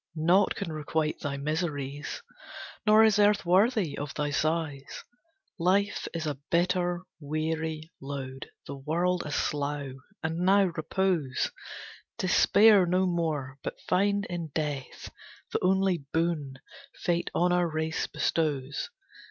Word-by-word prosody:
Naught 175 +5 +3
can 165 - -4
requite 155 0 -1
thy 140 -1 -3
miseries; 145 -2 -3 0.6
Nor 215 +1 +7
is 220 -1 +4
earth 205 -2 +4
worthy 190 - +3
of 145 -1 -5
thy 150 -1 -1
sighs. 155 -2 -2 0.6
Life 195 +4 +1
is 165 -1 -4
a 145 -3 -3
bitter, 175 0 +1 0.2
weary 155 +1 -3
load, 135 -1 -6 0.2
The 140 - -6
world 170 +6 0
a - - -5
slough. 145 -2 -2 0.3
And 160 +1 -2
now, 195 +3 +5
repose! 160 -5 0 0.7
Despair 200 +1 +5
no 185 +2 +2
more, 155 -6 -2
but - - -5
find 200 +2 +1
in 175 -3 -4
Death 145 -4 -4 0.4
The - - +1
only 190 -1 +3
boon 160 -5 -1 0.4
Fate 175 0 -1
on 175 +1 +3
our 175 -1 +2
race 160 +1 -2
bestows! 145 -4 -1
160 Hz, 125 wpm, -28 LUFS, 145-180 Hz, 0.7 s, Nor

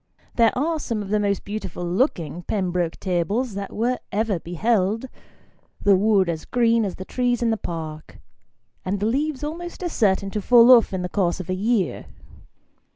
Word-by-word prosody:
There 230 -1 +3
are 320 +4 0
some 230 -7 -3
of 195 - -9
the 210 +1 +1
most 200 -1 -1
beautiful 195 -4 -5
looking 175 - -1
Pembroke 180 -3 -2
tables 200 +7 -1
that 200 0 -5
were 245 +3 -1
ever 210 -3 0
beheld: 205 +6 0 0.7
the 200 -1 +4
wood 200 -1 +3
as 160 -2 -3
green 230 -2 +2
as 190 - -4
the 185 - -8
trees 245 0 0
in 230 - +2
the - - +2
Park, 160 -6 -7 0.7
and 195 +2 -2
the 205 - -1
leaves 280 +5 -1
almost 345 +4 -6
as 350 - -3
certain 195 -2 +1
to 210 - -2
fall 240 +3 +7
off 240 -3 +6
in 185 -2 -3
the - - -1
course 180 -2 0
of 185 0 -5
a - - +1
year. 205 0 -1
205 Hz, 180 wpm, -23 LUFS, 185-240 Hz, 0.7 s, fall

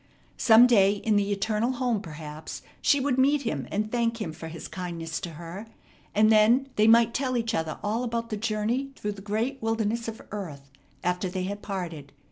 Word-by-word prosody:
Some 225 +1 +8
day 200 -5 +5
in 210 +1 0
the 205 0 +2
eternal 215 +4 0
home 245 -4 0
perhaps 155 -2 -8 0.2
she 285 - +4
would 265 -1 0
meet 280 +2 +3
him 230 - -3
and 215 +1 -2
thank 235 -1 0
him 170 -8 -4
for 165 +1 -8
his 165 0 -7
kindness 170 -3 -5
to 175 -3 -6
her, 170 +7 -8 0.5
and 215 +1 +5
then 230 +5 +5
they 215 +1 +4
might 230 0 +6
tell 260 -2 0
each 230 -1 -1
other 160 -6 -2
all 220 +4 0
about 230 -1 -3
the - - 0
journey 225 +5 -1
through 210 - -3
the 200 -1 -9
great 225 +7 -2
wilderness 225 +1 -1
of 225 0 -5
earth 150 -10 -7 0.3
after 180 +1 0
they 185 0 -3
had 205 +2 -4
parted. 170 -8 -5
215 Hz, 195 wpm, -27 LUFS, 185-230 Hz, 0.5 s, Some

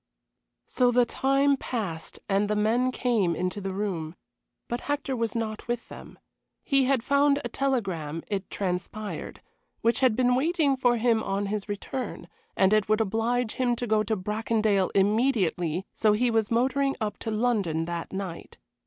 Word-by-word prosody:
So 250 -1 +2
the 245 0 +4
time 275 +3 +2
passed, 195 -12 -4
and 200 +1 +1
the 210 - +1
men 230 +5 +2
came 225 -10 +1
into 180 +4 -2
the 195 0 -3
room. 185 -5 -3 0.5
But 240 +1 -3
Hector 285 -2 -1
was 230 -1 -2
not 220 -1 -3
with 240 -1 -3
them. - - -11 0.5
He 275 -2 +3
had 260 -3 +1
found 280 +1 +3
a - - -2
telegram, 190 - -2
it 200 -2 -4
transpired, 200 +2 -4 0.4
which 230 0 +2
had 255 -5 +3
been 250 0 +3
waiting 290 +1 +2
for 245 -2 +2
him 230 -1 +2
on 200 -1 -1
his 205 +1 -3
return, 210 +5 -5 0.3
and 190 +1 +4
it 215 -1 +2
would 215 0 +3
oblige 225 +2 0
him 245 -2 +1
to 245 - -3
go 215 -2 +2
to 220 +1 0
Bracondale 210 0 +1
immediately, 195 - +1
so 215 -1 +3
he 240 +3 +2
was 225 -2 +1
motoring 270 +4 +1
up 210 -3 -3
to - - -4
London 210 -8 0
that 170 0 -5
night. 190 -3 -6
220 Hz, 165 wpm, -27 LUFS, 195-250 Hz, 0.5 s, the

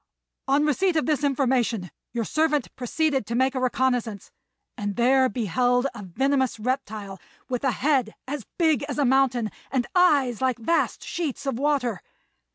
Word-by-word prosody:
On 280 +2 +3
receipt 345 +5 +1
of 310 - +1
this 300 -3 0
information 250 - +1 0.2
your 235 -2 -2
servant 305 -2 0
proceeded 270 0 -1
to 235 - -2
make 260 +2 +2
a 260 - -2
reconnaissance, 250 -4 -1 0.4
and 205 -1 -3
there 260 +2 +4
beheld 245 +2 +1
a - - -8
venomous 260 +6 0
reptile 215 -5 -3 0.3
with 250 0 -2
a 270 - +3
head 260 -5 +1
as 275 -3 -5
big 320 -6 +3
as 285 - -3
a 290 - +2
mountain 255 -4 +2 0.2
and 255 -3 0
eyes 285 - +3
like 260 -2 +1
vast 330 +9 0
sheets 310 -6 -4
of 270 -3 -2
water. 270 -8 0
260 Hz, 160 wpm, -25 LUFS, 235-285 Hz, 0.4 s, there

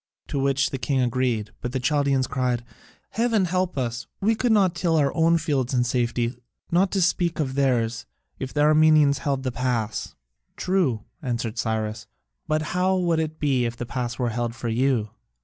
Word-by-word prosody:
To 140 - -1
which 135 0 +1
the 135 - -3
king 130 +2 0
agreed. 120 -3 0
But 125 0 -4
the 130 - 0
Chaldaeans 135 0 +1
cried, 125 -3 -1 0.5
"Heaven 225 -4 +2
help 180 -1 -1
us! 120 -2 -3
We 215 +3 +2
could 235 +2 0
not 195 -5 +4
till 170 -1 0
our 145 -3 +2
own 165 +1 +3
fields 140 -6 -1
in 120 - +3
safety, 120 0 0 0.4
not 185 +3 +3
to 195 -2 +2
speak 175 -1 +1
of 135 -4 -1
theirs, 120 -4 0 0.3
if 130 - -4
the 145 - 0
Armenians 155 -1 +5
held 135 -2 -1
the 130 - -1
pass." 120 -3 -2 0.4
"True," 170 - 0 0.2
answered 120 -4 -3
Cyrus, 110 0 -2 0.4
"but 155 0 +1
how 185 +1 +2
would 170 -3 +1
it 155 0 -3
be 135 -4 +1
if 115 0 -3
the 120 - -4
pass 120 0 -3
were 125 -2 0
held 120 0 -2
for 120 -1 -4
you?" 115 -2 +1
135 Hz, 185 wpm, -24 LUFS, 120-160 Hz, 0.5 s, Armenians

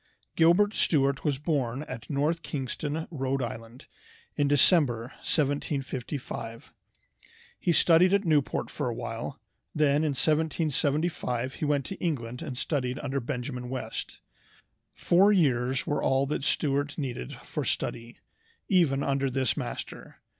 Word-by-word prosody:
Gilbert 175 +6 +5
Stuart 140 -7 +2
was 145 -3 +1
born 140 -3 -1
at 120 -5 -8
North 155 +3 0
Kingston, 145 +3 -3
Rhode 135 -3 -1
Island, 115 +1 -7 0.5
in 145 - +2
December, 140 -5 +3
1755. 135 -5 -3 0.9
He 175 - +1
studied 170 +2 +5
at 200 0 +2
Newport 150 -4 +1
for - - -2
awhile, - - -5 0.4
then 145 -2 +3
in 150 -1 +1
1775 150 -4 0
he - - -3
went 145 -2 +1
to 195 - -6
England 125 -8 -3
and 130 - -5
studied 130 -3 -1
under 140 -1 -2
Benjamin 125 0 -4
West. 125 -4 -5 0.7
Four 190 +4 +4
years 130 -8 +2
were 145 - -1
all 135 +1 +2
that 140 0 -2
Stuart 145 -1 0
needed 125 - -4
for - - -4
study, 115 +1 -3 0.5
even 155 -8 +3
under 135 0 +1
this 130 -1 0
master. - - -6
140 Hz, 125 wpm, -28 LUFS, 130-155 Hz, 0.9 s, Gilbert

